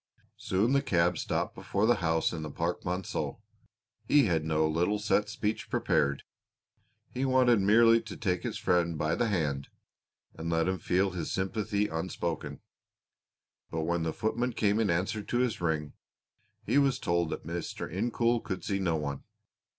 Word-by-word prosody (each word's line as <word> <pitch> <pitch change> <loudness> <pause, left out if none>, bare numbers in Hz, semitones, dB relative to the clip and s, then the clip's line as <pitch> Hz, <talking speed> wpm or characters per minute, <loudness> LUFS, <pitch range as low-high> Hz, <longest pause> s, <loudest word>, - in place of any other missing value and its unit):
Soon 105 +8 +1
the 140 - +4
cab 85 -4 +2
stopped - - -1
before 100 +2 -1
the 120 0 +4
house 80 -2 +1
in 80 - -4
the 75 - -5
Parc 85 +4 -2
Monceau. 90 +1 -3 0.7
He 145 -1 +5
had 80 -5 +1
no 80 0 +1
little 85 +6 +1
set 105 0 +1
speech 105 +1 -3
prepared; 70 0 +1 0.9
he 130 - -3
wanted 130 -4 +4
merely 115 +3 +5
to 110 -3 -9
take 90 -5 -1
his - - -4
friend 85 -2 +1
by 80 +2 0
the 115 +7 +1
hand 75 -9 -1 0.7
and 80 +1 -5
let 80 0 +1
him 95 0 -1
feel 95 +2 +1
his 90 -4 -4
sympathy 105 +2 -1
unspoken, 80 -3 -4 1.1
but 80 - -2
when 85 +1 0
the 80 -1 -1
footman 120 +6 -1
came 105 -1 +1
in 110 - +2
answer 95 +5 0
to 120 - -2
his 125 -5 0
ring, 80 -3 -1 0.7
he 140 - +3
was 140 -2 +3
told 85 -1 0
that - - -5
Mr. 85 +1 -4
Incoul 115 +5 0
could 95 -2 -4
see 100 -1 -1
no 85 -4 +1
one. 70 -3 -3
95 Hz, 165 wpm, -30 LUFS, 80-110 Hz, 1.1 s, He